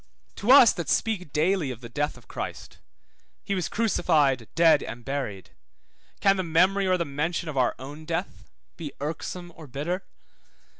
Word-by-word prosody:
To 215 Hz, +5 st, +2 dB
us 255 Hz, -5 st, +9 dB
that 170 Hz, -, -5 dB
speak 190 Hz, -9 st, 0 dB
daily 165 Hz, 0 st, +1 dB
of 125 Hz, -2 st, -7 dB
the 120 Hz, -, -8 dB
death 145 Hz, +5 st, -2 dB
of -, -, -19 dB
Christ -, -, -7 dB, 0.6 s
(he 200 Hz, -, -2 dB
was 185 Hz, -4 st, -1 dB
crucified, 155 Hz, -, +2 dB
dead, 165 Hz, -1 st, +5 dB
and 120 Hz, 0 st, -8 dB
buried), 120 Hz, -10 st, -4 dB, 0.7 s
can 195 Hz, -1 st, +4 dB
the 185 Hz, -, 0 dB
memory 185 Hz, +4 st, +3 dB
or 185 Hz, 0 st, +3 dB
the 170 Hz, -, -1 dB
mention 160 Hz, +5 st, -2 dB
of 155 Hz, -, -5 dB
our 130 Hz, -2 st, +2 dB
own 145 Hz, +4 st, -9 dB
death 170 Hz, +3 st, -4 dB, 0.3 s
be 155 Hz, -5 st, -6 dB
irksome 165 Hz, +4 st, -5 dB
or 160 Hz, -2 st, -11 dB
bitter? 155 Hz, +8 st, -3 dB
165 Hz, 165 wpm, -26 LUFS, 140-185 Hz, 0.7 s, us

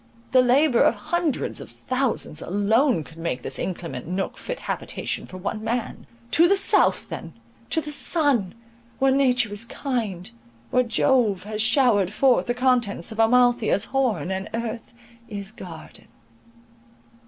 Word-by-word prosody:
The 255 Hz, -, +6 dB
labour 255 Hz, +1 st, +3 dB
of -, -, +4 dB
hundreds 315 Hz, +7 st, -2 dB
of -, -, -10 dB
thousands 255 Hz, -, -2 dB
alone 210 Hz, -, +1 dB
could 165 Hz, +2 st, -15 dB
make 165 Hz, -7 st, -3 dB
this 135 Hz, -, -3 dB
inclement 165 Hz, -8 st, -5 dB
nook 185 Hz, +2 st, -3 dB
fit -, -, -6 dB
habitation -, -, -3 dB
for 185 Hz, -, -9 dB
one 215 Hz, +4 st, -4 dB
man. 230 Hz, +1 st, -3 dB, 0.2 s
To 335 Hz, +3 st, +5 dB
the 395 Hz, +2 st, +3 dB
south 390 Hz, -, +3 dB
then, -, -, -7 dB, 0.4 s
to 320 Hz, -, +1 dB
the 300 Hz, 0 st, -4 dB
sun!—where 235 Hz, -, 0 dB
nature 255 Hz, -5 st, +2 dB
is 205 Hz, +2 st, -1 dB
kind, 225 Hz, -9 st, -4 dB, 0.4 s
where 250 Hz, -, +4 dB
Jove 230 Hz, -4 st, +1 dB
has 215 Hz, +1 st, -3 dB
showered 220 Hz, -, +3 dB
forth 255 Hz, +3 st, +2 dB
the 240 Hz, -, 0 dB
contents 245 Hz, -8 st, +1 dB
of 220 Hz, -, -8 dB
Amalthea's 240 Hz, -2 st, +3 dB
horn, 250 Hz, -8 st, 0 dB
and 190 Hz, +1 st, -4 dB
earth 230 Hz, 0 st, -5 dB, 0.4 s
is 200 Hz, -1 st, -6 dB
garden. 175 Hz, -7 st, -11 dB
230 Hz, 140 wpm, -24 LUFS, 200-260 Hz, 0.4 s, The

